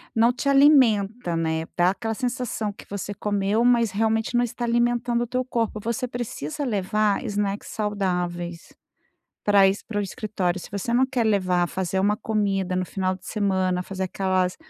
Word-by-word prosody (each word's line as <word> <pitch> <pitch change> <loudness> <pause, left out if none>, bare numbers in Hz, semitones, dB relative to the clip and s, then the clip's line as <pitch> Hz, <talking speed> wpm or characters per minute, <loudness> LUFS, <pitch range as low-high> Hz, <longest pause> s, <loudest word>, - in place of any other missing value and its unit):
não 230 +2 +5
te 255 +3 -4
alimenta, 245 - +4
né, 160 0 -1
dá 175 +1 +4
aquela 225 +3 -2
sensação 240 -3 -2
que - - -14
você 200 0 -5
comeu, 205 +3 0
mas 235 -3 +4
realmente 225 +2 0
não 240 - +3
está 240 0 -4
alimentando 240 0 +1
o 240 - -5
teu 255 +1 -1
corpo, 230 -3 -2
você 235 +3 -2
precisa 240 - -5
levar 210 -2 0
snacks 205 0 -2
saudáveis 180 -5 -3 0.7
para 200 -2 +6
isso 195 +2 0
para 210 - -2
o - - +2
escritório. 190 -2 -2
Se - - -10
você 205 +4 -2
não 255 +2 +5
quer 260 -3 -1
levar, 185 -4 +2
fazer 190 +1 -2
uma 205 +2 +2
comida 195 -4 -1
no 185 - 0
final 185 0 -1
de 185 - -17
semana, 190 -3 0
fazer 190 0 -4
aquelas, 185 -1 0
205 Hz, 170 wpm, -24 LUFS, 185-235 Hz, 0.7 s, para